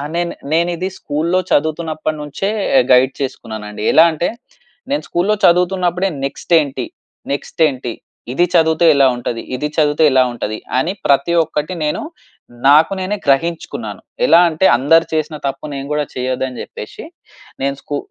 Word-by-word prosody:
నేను 175 0 -1 0.2
నేను 170 +2 +2
ఇది 185 +3 -2
స్కూల్‌లో 160 +5 0
చదువుతున్నప్పటి 155 0 -1
నుంచే 150 +7 -3 0.4
గైడ్ 130 +1 +5
చేసుకున్నానండి. 110 -5 -6
ఎలా 160 - +7
అంటే, 160 +2 -1 0.6
నేను 290 - 0
స్కూల్‌లో 195 +5 +1
చదువుతున్నప్పుడే, 180 +1 +2 0.2
నెక్స్ట్ 140 +5 -4
ఏంటి, 135 -3 -4 0.5
నెక్స్ట్ 145 +3 -4
ఏంటి? 125 -4 -4 0.4
ఇది 175 +5 +3
చదివితే 160 0 +3
ఎలా 135 -1 +5
ఉంటది? 120 -1 -4
ఇది 150 +4 -2
చదివితే 150 0 +2
ఎలా 130 -1 +5
ఉంటది? 110 -2 -4 0.2
అని 165 +9 0
ప్రతి 140 +4 +3
ఒక్కటి 150 +2 -3
నేను, 150 - -1 0.7
నాకు 150 +5 +6
నేనే 190 +3 -2
గ్రహించుకున్నాను. 165 +5 -1 0.2
ఎలా - - +6
అంటే 160 +4 0
అందరు 165 +6 +4
చేసిన 155 0 -1
తప్పు 135 +2 -5
నేను 135 0 -5
కూడా 150 - 0
చేయదు 130 +1 -2
అని 125 - -8
చెప్పేసి - - -9 0.6
నేను 140 0 0
స్కూ 145 0 -4
150 Hz, 145 wpm, -17 LUFS, 135-170 Hz, 0.7 s, ఎలా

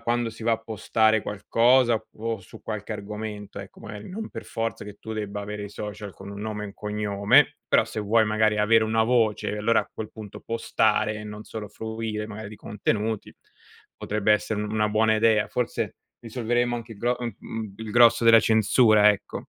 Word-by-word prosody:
quando 120 0 0
si 115 +1 -12
va 115 +1 +2
a 110 - +1
postare 110 0 +1
qualcosa, 120 +4 +3 0.2
op 115 -1 -3
su 90 - -14
qualche 110 0 -5
argomento, 105 0 -6
ecco, 100 -1 -11
magari 105 -2 -9
non 215 +4 -6
per - - -8
forza 115 0 -3
che 105 0 -9
tu 110 - -7
debba 105 -2 -4
avere 105 0 -5
i - - -7
social 105 -1 -7
con 100 +1 -10
un 100 0 -7
nome 105 0 -4
e - - -4
un 100 - -12
cognome, 105 -1 +2
però - - +4
se 110 - -5
vuoi 110 +2 +3
magari 110 0 +2
avere 110 +2 +4
una 110 +1 +2
voce, 115 -3 +1
e 105 - -4
allora 115 +2 +3
a - - -10
quel 110 - -6
punto 105 -3 -10
postare, 110 -2 +1
e 105 - -7
non 105 0 -8
solo 110 -2 -7
fruire 110 0 -4
magari 105 -1 -7
di 105 - -10
contenuti, 105 +1 -2 0.6
potrebbe 105 0 +1
essere 105 0 0
una 105 0 0
buona 110 +1 +3
idea. 110 -1 +3
Forse 125 -1 -2 0.2
risolveremo 120 +1 -1
anche 115 -1 -8
il 105 - -13
gro 120 +3 0
mhmm, 120 -3 -4
mhmm, 110 -3 -6
il 110 -1 -7
grosso 115 +1 +5
della 115 0 +8
censura, 110 -1 +5
ecco. 105 - -5
110 Hz, 195 wpm, -25 LUFS, 105-115 Hz, 0.6 s, della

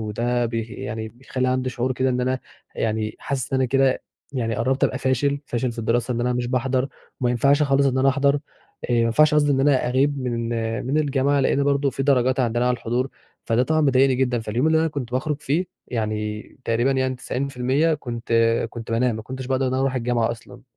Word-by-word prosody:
وده 120 +3 -1
بي 115 0 -2
يعني 110 0 -6
بيخلّي 130 +2 -3
عندي 130 0 0
شعور 125 +1 -1
كده 130 +1 0
إن 125 - 0
أنا 130 +1 0 0.4
يعني 110 -1 -2
حاسس 135 -1 -3
إن 130 - +2
أنا 130 - +3
كده 135 +1 +2 0.3
يعني 115 -4 -1
قرّبت 130 +4 +1
أبقى 130 - 0
فاشل، 140 +2 +1
فاشل 120 0 -1
في 115 - -13
الدراسة 120 +2 0
إن 120 - -2
أنا 125 +1 +1
مش 120 0 -1
باحضر 130 +1 0 0.3
وما 125 -1 +2
ينفعش 140 +5 +3
خالص 140 -1 +3
إن 130 0 +1
أنا 135 +1 +4
أحضر، 140 +1 +3
آآ 145 - -1 0.5
ما 120 - +3
ينفعش 150 +7 +4
قصدي 145 -1 +3
إن 135 - +2
أنا 135 -3 +3
أغيب 140 +3 +1
من 120 -2 -2 0.4
من 145 +4 +1
الجامعة 140 -1 +2
لإن 140 +1 +2
برضه 140 -1 +2
في 135 - -3
درجات 130 -2 +2
عندنا 120 0 +1
على 125 - +2
الحضور، 120 +3 -1 0.4
فده 115 +1 +2
طبعًا 155 +3 +1
مضايقني 135 -2 +4
جدًا، 125 -1 +1
فاليوم 115 +7 -1
اللي 160 0 +4
أنا 165 - +2
كنت 135 -5 -5
باخرُج 145 +3 -1
فيه 165 +7 0 0.2
يعني 105 -2 -2 0.2
تقريبًا 120 +4 +1
يعني 130 -1 0
90% 135 +4 0
كنت 120 -5 -6 0.4
كنت 115 -1 -8
بانام، 115 0 +1
ما 110 - -6
كنتش 130 +2 -7
باقدر 130 0 0
إن 130 - -1
أنا 130 - 0
أروح 135 -1 0
الجامعة 120 -2 0
أصلًا. 115 - -10
130 Hz, 210 wpm, -23 LUFS, 120-135 Hz, 0.5 s, أنا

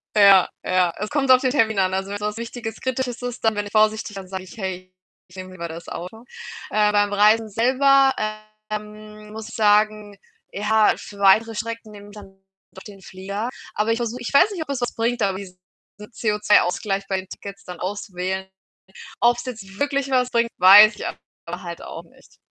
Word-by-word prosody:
Ja, 200 -3 +6 0.2
ja, 180 -2 +2
es 210 +1 -4
kommt 275 -3 +1
auf 255 - +7
den 260 - +1
Termin 220 -6 +1
an. 185 -1 +1
Also 190 +1 -2
wenn’s 205 - -4
was 210 0 -2
Wichtiges, 230 -1 -7
Kritisches 260 -1 -3
ist, 245 -1 -6
dann 220 - +3
bin 205 0 -3
ich 205 - -9
vorsichtiger 215 -1 +1
dann 185 - -14
sage 190 -1 -5
ich: 185 +1 -14
„Hey, 185 -2 -6 0.4
ich 175 - -18
nehme 185 0 -8
lieber 170 -2 -6
das 165 +1 -9
Auto.“ 220 +7 -8 0.4
Äh, 210 -1 +2
beim 205 0 +1
Reisen 215 +2 +4
selber, 270 +5 +4 0.6
ähm, 210 0 -8
muss 220 0 -8
ich 230 - -10
sagen, 210 -1 +2 0.3
ja, 215 +1 +2
für 205 - -11
weitere 220 +3 +4
Strecken 230 0 -6
nehme 205 0 -12
ich 205 - -15
dann 195 -2 -13 0.4
doch 190 - -12
den 200 -2 -13
Flieger. 200 +5 -5 0.2
Aber 215 +2 0
ich - - -2
versuch 235 0 -3
ich 245 - -6
weiß 360 +9 +5
nicht, 370 -5 -5
ob 280 - -28
es 270 -3 -3
was 245 - -2
bringt, 235 +1 -1
aber 195 -2 0
diesen 185 -2 -10 0.4
CO₂-Ausgleich 210 -2 0
bei 190 - -1
den 190 - -19
Tickets 200 0 -10
dann 180 - -9
auswählen. 190 -1 -4 0.7
Ob’s 240 0 +2
jetzt 205 -6 -9
wirklich 280 0 -1
was 250 -1 +1
bringt, 235 -1 +1
weiß 205 +4 +8
ich - - -7
aber 175 +2 -9
halt 170 -1 -7
auch - - -8
nicht. - - -23
210 Hz, 195 wpm, -22 LUFS, 195-230 Hz, 0.7 s, weiß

